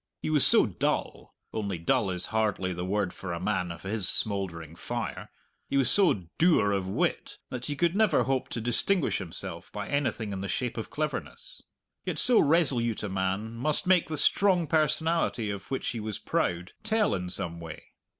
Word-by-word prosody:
He - - -3
was 150 -3 +4
so - - +5
dull - - -3 0.2
only 100 -4 -3
dull 85 +4 +1
is 90 0 +1
hardly 105 -4 0
the 90 +1 -5
word 95 0 -1
for 95 - -7
a 85 - -4
man 90 -2 -1
of 85 - -10
his 100 -1 +2
smouldering 85 -6 +2
fire - - -5 0.4
he 140 - 0
was 130 -3 +3
so 180 - +3 0.2
dour 160 - +4
of 95 -2 -1
wit 95 - -2
that 125 -1 -5
he 145 - -3
could 170 +3 +1
never 210 -7 +3
hope 135 -1 -1
to - - -2
distinguish 140 - +1
himself 90 -4 -7
by - - -5
anything 125 -7 -1
in 95 - -4
the 100 - -4
shape 125 +4 -2
of 110 - -5
cleverness. 155 - -5 0.4
Yet - - -3
so 245 -2 +5
resolute 135 -9 +2
a 105 - -3
man 95 +4 -2
must 145 +6 +1
make 180 -2 +3
the 155 - -3
strong 180 +3 +3
personality 160 -7 +1
of 100 -1 -8
which 135 - -2
he 120 - -4
was 110 -2 -4
proud 85 +1 -2
tell 220 -1 +1
in 90 -2 -3
some 85 -1 -1
way. 80 -2 -10
110 Hz, 190 wpm, -28 LUFS, 95-155 Hz, 0.4 s, so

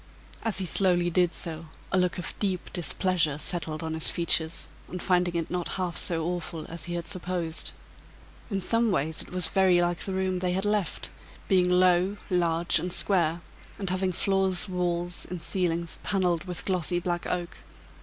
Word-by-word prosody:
As 225 -3 0
he 190 - +1
slowly 175 -1 +2
did 175 0 +3
so, 165 -1 -5 0.2
a - - +2
look 180 -1 +1
of 180 - -5
deep 190 -3 -2
displeasure 175 -3 +1
settled 155 0 0
on 160 0 -3
his 160 -1 +3
features, 170 -1 +2 0.2
on 180 - -5
finding 180 -1 +1
it 165 -1 -2
not 175 -1 -1
half 180 -2 -2
so 165 -2 -1
awful 175 -2 -4
as 165 -1 -3
he 175 0 -4
had 170 -1 -4
supposed. 180 -4 -3 0.8
In 195 -3 -1
some 230 +4 +2
ways 155 -4 0
it - - -11
was 180 -2 +1
very 190 -2 +4
like 175 -1 +1
the 190 - -2
room 190 -1 0
they 180 0 0
had 190 +2 +1
left, 205 -3 -1 0.4
being 180 -2 +3
low, 180 +2 +3
large, 170 -1 +2
and 180 - -3
square, 170 -3 +3 0.4
and 195 -3 -2
having 185 0 0
floors, 190 0 +2
walls 175 -1 -2
and 180 - -4
ceiling 170 0 -1
paneled 180 -4 0
with 180 -2 -2
glossy 180 -2 0
black 175 -1 -2
oak. 175 -1 -3
180 Hz, 175 wpm, -27 LUFS, 170-185 Hz, 0.8 s, very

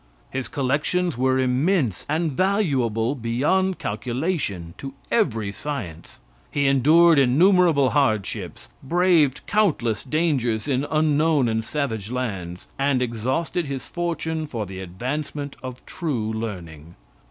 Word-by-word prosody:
His 130 -1 -3
collections 150 +5 0
were 130 +1 +2
immense, 130 - +1
and 160 +1 0
valuable 135 - +1
beyond 145 +10 0
calculation 110 - -3
to 135 0 -7 0.2
every 115 - +1
science. 100 - -6 0.3
He 140 -1 0
endured 150 +4 +5
innumerable 155 +1 +4
hardships, 110 -9 -1
braved 165 -2 +3
countless 150 - +1
dangers 135 -6 0
in 135 0 0
unknown 155 -2 +2
and 110 0 0
savage 110 -7 -3
lands, 95 -9 -4
and 135 -1 +2
exhausted 130 +8 -1
his 135 -2 -5
fortune 160 -2 -3
for 115 -6 -4
the 95 -1 -8
advancement 135 - -4
of 130 -1 -8
true 120 -11 -3
learning. 85 -8 -6
135 Hz, 115 wpm, -23 LUFS, 115-160 Hz, 0.3 s, endured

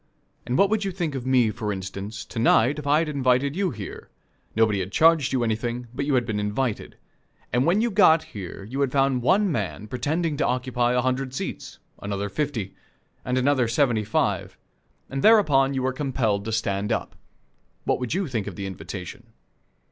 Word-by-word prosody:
And 125 - 0
what 200 +1 +4
would 220 -1 +1
you 195 - -1
think 170 -5 -3
of 130 -2 -5
me, 125 -4 +3
for 110 -1 -3
instance, 100 +2 -6
to - - -6
night, 120 +5 +4
if 145 - -7
I 145 +1 +4
had 165 0 +1
invited 135 0 +1
you 195 0 +1
here 105 - -8 0.5
nobody 110 -2 +3
had 95 +1 -4
charged 160 -1 +4
you 130 -2 +1
anything, 120 +2 -2
but 140 +3 -3
you 145 - +2
had 125 -2 +2
been 110 -2 -2
invited 105 +3 -2 0.6
and 125 +4 +2
when 190 +5 +3
you 235 0 +1
got 175 -6 +5
here 100 -1 -7
you 130 +8 -4
had 135 -2 +1
found 135 -2 +2
one 190 - +3
man 100 - -3
pretending 150 +6 -1
to - - +1
occupy 125 -1 0
a 125 - +3
hundred 130 0 -1
seats, - - -5 0.2
another 100 0 -3
fifty, 120 -4 -3 0.5
and 125 +1 -1
another 130 -1 +2
seventy 120 -3 +2
five, 105 - -1 0.5
and 135 0 -4
thereupon 145 -12 +5
you 130 - -1
were 130 0 0
compelled 120 -8 -1
to 110 - -3
stand 105 -2 -1
up - - -2 0.7
what - - 0
would 125 +4 -2
you 190 0 0
think 115 -7 -3
of - - -6
the 100 - -5
invitation? 95 +6 -7
125 Hz, 195 wpm, -24 LUFS, 110-145 Hz, 0.7 s, got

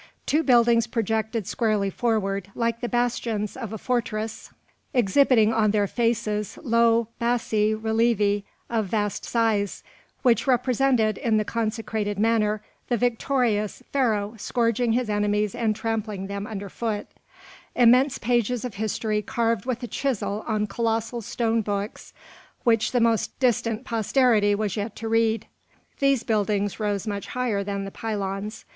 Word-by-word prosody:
Two 305 +3 +2
buildings 235 -4 +4
projected 220 -1 -1
squarely 210 -3 0
forward, 200 -4 -1
like 230 0 -1
the 240 - -2
bastions 235 -3 -1
of 230 -5 -6
a 220 - -4
fortress, 220 -2 -2 0.5
exhibiting 235 -1 +4
on 215 -2 +3
their 205 0 +2
faces 215 -2 -1
low 230 -1 +3
bassi 220 -3 +1
relievi 220 -2 +1 0.3
of 225 -3 -1
vast 205 0 -1
size, 220 -4 0 0.4
which 245 0 +3
represented, 250 -3 +2
in 225 -2 +2
the 215 - +1
consecrated 220 -2 -2
manner, 215 -1 +1 0.3
the 240 - +2
victorious 235 -3 0
Pharaoh 220 -6 +1
scourging 230 +1 +1
his 245 0 0
enemies 210 -1 0
and 220 -3 0
trampling 215 -3 -3
them 200 +1 -5
under 205 -2 -5
foot; 215 +1 -3 0.7
immense 250 +3 +5
pages 240 0 0
of 245 - -5
history 215 +1 -1
carved 230 0 -1
with 250 -1 -2
a - - -3
chisel 225 -6 -2
on 215 -2 0
colossal 230 +2 -1
stone 230 +1 0
books 205 0 -4 0.5
which 225 -2 +2
the 245 - +2
most 230 -2 +1
distant 235 -2 +1
posterity 225 -2 +3
was 205 -2 -2
yet 210 0 -4
to 225 - -5
read. 225 0 +1 0.5
These 275 -3 +3
buildings 205 -2 0
rose 205 -2 -1
much 205 -2 -4
higher 240 -6 -1
than 200 0 -3
the 195 - -7
pylons. 205 0 -4
225 Hz, 140 wpm, -25 LUFS, 210-235 Hz, 0.7 s, immense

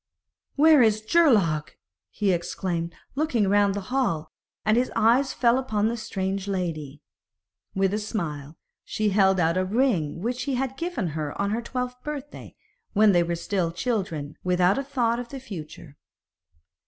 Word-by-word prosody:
'Where 310 -1 +6
is 215 -2 +4
Geirlaug?' 205 - +3 0.4
he 205 -2 0
exclaimed, 170 -1 -3 0.2
looking 265 -8 +1
round 200 0 +3
the 205 +5 -6
hall; 200 - 0 0.3
and 215 0 +4
his 250 +2 +1
eyes 235 +5 +3
fell 240 +1 +3
upon 220 -4 0
the 235 - -2
strange 195 -3 -3
lady. 155 -7 -4 0.7
With 195 0 +1
a 210 - 0
smile 160 - -5 0.3
she 215 -1 -1
held 190 -1 +3
out 165 +1 +2
a 185 - +2
ring 185 - 0
which 245 +2 -2
he 275 -2 -1
had 265 +1 -2
given 335 - -3
her 150 -1 -5
on 200 0 0
her 225 +2 -1
twelfth 250 +1 -4
birthday, 290 -1 -7 0.4
when 215 0 +5
they 175 -2 +4
were 170 0 -1
still 170 0 -1
children, 170 - -3
without 180 +4 +2
a - - -2
thought 245 -4 0
of 245 -1 -6
the 275 - -7
future. 160 - -9
205 Hz, 160 wpm, -25 LUFS, 175-245 Hz, 0.7 s, Where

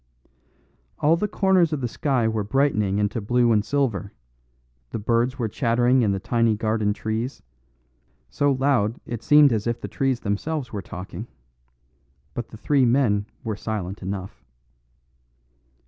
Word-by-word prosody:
All 155 +3 +3
the 210 +5 -1
corners 190 -5 +2
of 150 - -1
the 125 - 0
sky 125 0 0
were 110 -1 -1
brightening 105 -4 +1
into 105 +3 0
blue 120 +3 +2
and 105 -2 +3
silver; 115 -8 -1 0.8
the - - -4
birds 115 +4 0
were 115 - -1
chattering 120 +3 +2
in 105 -4 +2
the 95 - -1
tiny 115 +2 +1
garden 110 -1 0
trees; 110 +5 -3 0.8
so 145 0 +1
loud 130 -5 +1
it 120 -2 -5
seemed 145 -2 +6
as 110 0 -1
if 120 0 -1
the - - -6
trees 135 -3 -1
themselves 125 +6 -3
were 100 - -3
talking. 95 +4 -8 1.1
But 120 - -4
the 110 - -11
three 140 +4 +2
men 115 -5 +2 0.2
were 110 -2 -2
silent 100 -3 -4
enough. 95 0 -6
115 Hz, 145 wpm, -24 LUFS, 105-135 Hz, 1.1 s, seemed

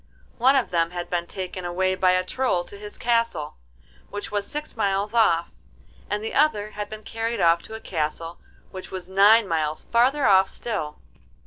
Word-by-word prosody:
One 260 +4 +5
of 265 -4 +1
them 165 -1 +2
had 175 0 -6
been 175 -1 -1
taken 185 -1 -6
away 185 +2 0
by 185 -1 +3
a 185 0 +2
Troll 185 -3 0
to 200 - -12
his 210 0 -9
castle, 230 -11 0 0.5
which 205 - -6
was 205 -1 -1
six 300 +1 -6
miles 200 -1 0
off, 170 -8 +3 0.6
and 210 +1 -2
the 220 - -4
other 215 -8 +2
had 205 0 -5
been 215 0 -9
carried 225 +2 -3
off 170 0 +4
to 220 - -9
a - - -6
castle 165 -2 -3 0.3
which 185 -1 -8
was 185 -1 -6
nine 205 +3 +5
miles 155 -2 -1
farther 260 +4 +2
off 190 -1 +5
still. 195 -11 -4
195 Hz, 185 wpm, -24 LUFS, 175-225 Hz, 0.6 s, One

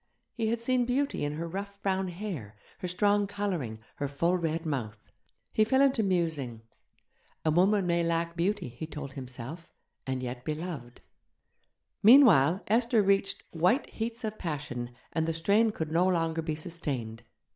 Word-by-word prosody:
He 225 -2 -1
had 230 +1 0
seen 245 +1 +2
beauty 270 - 0
in 145 0 -1
her 165 +2 -4
rough 200 +3 -6
brown 190 -1 +1
hair, 175 - -6 0.2
her 180 - -3
strong 205 +3 +2
colouring, 185 - -3 0.2
her 145 - -1
full 170 +6 +1
red 165 -1 -1
mouth. 110 -8 -4 0.4
He 215 - +4
fell 265 +5 +2
into 270 -4 +3
musing... 160 - -1 0.8
a 155 - +4
woman 190 +4 +3
may 170 -1 +2
lack 170 0 0
beauty, 185 0 0
he 125 +6 -7
told 145 -3 -7
himself, 130 +6 -7 0.4
and 130 -1 -2
yet 125 0 -5
be 155 - -2
loved.... 150 -8 -7 1.0
Meanwhile 200 - +7
Esther 230 0 +3
reached 195 0 +2
white 180 - +2
heats 230 +1 -4
of 215 -1 -4
passion, 140 -7 -4 0.2
and 160 -1 0
the 165 - 0
strain 200 +8 +3
could 160 -7 -4
no 175 +3 +3
longer 165 -3 +1
be 160 -1 -2
sustained. 140 -9 -4
170 Hz, 160 wpm, -29 LUFS, 145-205 Hz, 1.0 s, Meanwhile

